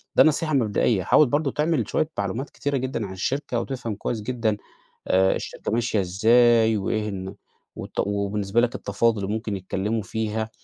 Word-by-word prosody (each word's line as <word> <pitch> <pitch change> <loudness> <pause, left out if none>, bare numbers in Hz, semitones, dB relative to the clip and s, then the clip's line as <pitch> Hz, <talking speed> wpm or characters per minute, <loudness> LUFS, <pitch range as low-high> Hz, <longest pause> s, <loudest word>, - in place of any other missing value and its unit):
ده - - +8
نصيحة 155 0 +1
مبدئية. 110 -5 +2
حاول 150 - +5
برضه 145 +2 0
تعمل 150 -7 0
شوية 155 - 0
معلومات 115 +7 -2
كتيرة 145 -1 -2
جدًا 130 -4 -2
عن 95 - -8
الشركة، 125 +6 -2
وتفهم 120 -4 -4
كويس 110 +2 -3
جدًا 115 -2 -1 0.5
آآ، 95 +1 +3
الشركة - - -5
ماشية 115 -2 +1
إزاي، 110 +4 +4
وإيه 105 +2 -1
إن 95 -2 -5 0.4
والت - - -4
وبالنسبة 100 +1 0
لك 120 0 0
التفاوض 110 +2 0
اللي 100 -1 -3
ممكن 110 -2 -3
يتكلموا 100 +4 -2
فيها. 110 +2 -3
110 Hz, 165 wpm, -24 LUFS, 100-125 Hz, 0.5 s, ده